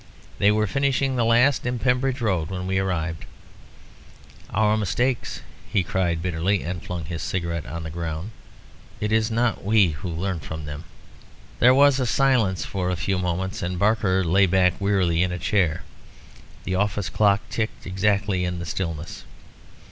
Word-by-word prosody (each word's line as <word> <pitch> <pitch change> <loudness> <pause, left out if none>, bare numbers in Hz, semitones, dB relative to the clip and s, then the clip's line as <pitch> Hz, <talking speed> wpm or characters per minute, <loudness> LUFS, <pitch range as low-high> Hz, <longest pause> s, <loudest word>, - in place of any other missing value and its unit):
They 105 - +5
were 105 0 +2
finishing 135 +4 0
the 120 - +1
last, 120 +4 +3
in 125 0 -1
Pembridge 125 +1 0
Road, 90 -8 0
when 90 -1 -4
we 95 0 0
arrived. 85 -4 -2 1.3
Our 105 0 +2
mistakes," 120 +5 -1 0.3
he 100 - +2
cried 85 -2 -1
bitterly, 90 +3 0
and 90 0 -4
flung 90 -3 -5
his 80 +1 -5
cigarette 85 -6 -3
on 80 +5 -5
the 80 - -6
ground. 85 +4 -4 0.7
"It 105 0 -2
is 110 0 +2
not 115 0 0
we 105 -3 +4
who 75 +3 -5
learn 85 +2 -2
from 80 +1 -7
them." 75 +2 -7 0.7
There 125 +2 +6
was 140 0 +5
a 125 - 0
silence 115 -8 +2
for 90 -2 -2
a 90 - 0
few 95 +2 -1
moments, 90 +3 -2
and 90 +1 -3
Barker 100 -2 +2
lay 95 +3 +4
back 90 -1 +3
wearily 95 -4 +2
in 90 0 +1
a 90 - -3
chair. 90 -2 0 0.8
The 95 - -3
office 105 0 0
clock 100 -1 +3
ticked 110 -1 -3
exactly 100 0 0
in 90 0 -2
the 85 - -5
stillness. 85 -1 -4
95 Hz, 165 wpm, -24 LUFS, 85-110 Hz, 1.3 s, There